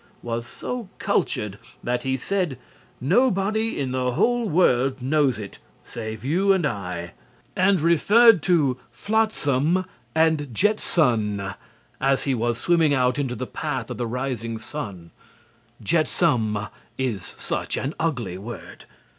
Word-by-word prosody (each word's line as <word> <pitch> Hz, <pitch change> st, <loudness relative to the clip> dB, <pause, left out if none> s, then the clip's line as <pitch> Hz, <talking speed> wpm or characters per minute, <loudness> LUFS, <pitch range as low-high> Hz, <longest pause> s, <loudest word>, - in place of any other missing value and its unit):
was 115 Hz, 0 st, -3 dB
so 240 Hz, -, -5 dB
cultured 105 Hz, -1 st, -1 dB, 0.2 s
that 125 Hz, 0 st, 0 dB
he 130 Hz, -1 st, -1 dB
said, 180 Hz, -1 st, -1 dB, 0.4 s
"Nobody 215 Hz, -, +2 dB
in 135 Hz, -2 st, -1 dB
the 125 Hz, -1 st, 0 dB
whole 240 Hz, -, +2 dB
world 135 Hz, -6 st, +3 dB
knows 135 Hz, -2 st, +2 dB
it, 105 Hz, -2 st, -8 dB, 0.2 s
save 110 Hz, 0 st, -7 dB
you 185 Hz, +8 st, +3 dB
and 185 Hz, -5 st, +1 dB
I," 90 Hz, -8 st, -4 dB, 0.4 s
and 190 Hz, 0 st, +3 dB
referred 200 Hz, +6 st, +6 dB
to 140 Hz, -8 st, +3 dB
"flotsam 185 Hz, -6 st, +1 dB, 0.3 s
and 160 Hz, -4 st, +2 dB
jetson" 115 Hz, -, +1 dB, 0.5 s
as 135 Hz, 0 st, +2 dB
he 135 Hz, -, +1 dB
was 120 Hz, -1 st, 0 dB
swimming 165 Hz, -2 st, +3 dB
out 125 Hz, +1 st, +2 dB
into 130 Hz, -3 st, -1 dB
the 130 Hz, -, -4 dB
path 145 Hz, 0 st, -4 dB
of -, -, -5 dB
the 120 Hz, -, -2 dB
rising 120 Hz, -2 st, -3 dB
sun. 100 Hz, -, -7 dB, 0.7 s
"Jetsam" 140 Hz, -, +2 dB, 0.4 s
is 120 Hz, -8 st, -2 dB
such -, -, -3 dB
an 140 Hz, +4 st, -2 dB
ugly 120 Hz, -, -2 dB
word. 115 Hz, +4 st, -9 dB
135 Hz, 130 wpm, -24 LUFS, 120-175 Hz, 0.7 s, referred